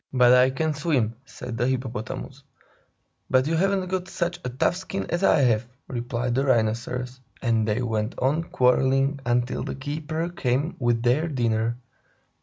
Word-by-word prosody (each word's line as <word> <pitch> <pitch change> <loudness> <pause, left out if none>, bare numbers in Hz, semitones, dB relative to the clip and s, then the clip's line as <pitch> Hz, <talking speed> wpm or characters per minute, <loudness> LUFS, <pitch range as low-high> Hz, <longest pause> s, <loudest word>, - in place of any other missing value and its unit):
"But 125 -2 +5
I 125 +1 +6
can 155 +4 -1
swim!" 140 -7 0
said 125 -2 -7
the 120 - +2
Hippopotamus. 130 +1 -4 0.9
"But 130 0 +4
you 160 - 0
haven't 190 +2 +1
got 185 0 -2
such 175 -2 -2
a - - -2
tough 130 +7 +1
skin 190 +1 -4
as 175 +2 0
I 155 - +5
have," 120 -2 +2 0.2
replied 120 0 -2
the 135 +2 +1
Rhinoceros. 125 +1 0 0.2
And 115 -3 +1
they 110 +4 0
went 110 -1 -2
on 150 +6 +1
quarreling 135 +2 +2
until 120 +1 +1
the - - -4
keeper 155 +4 -3
came 140 -1 -1
with 120 -2 +1
their 130 +7 +2
dinner. 115 -4 0
130 Hz, 160 wpm, -25 LUFS, 120-150 Hz, 0.9 s, I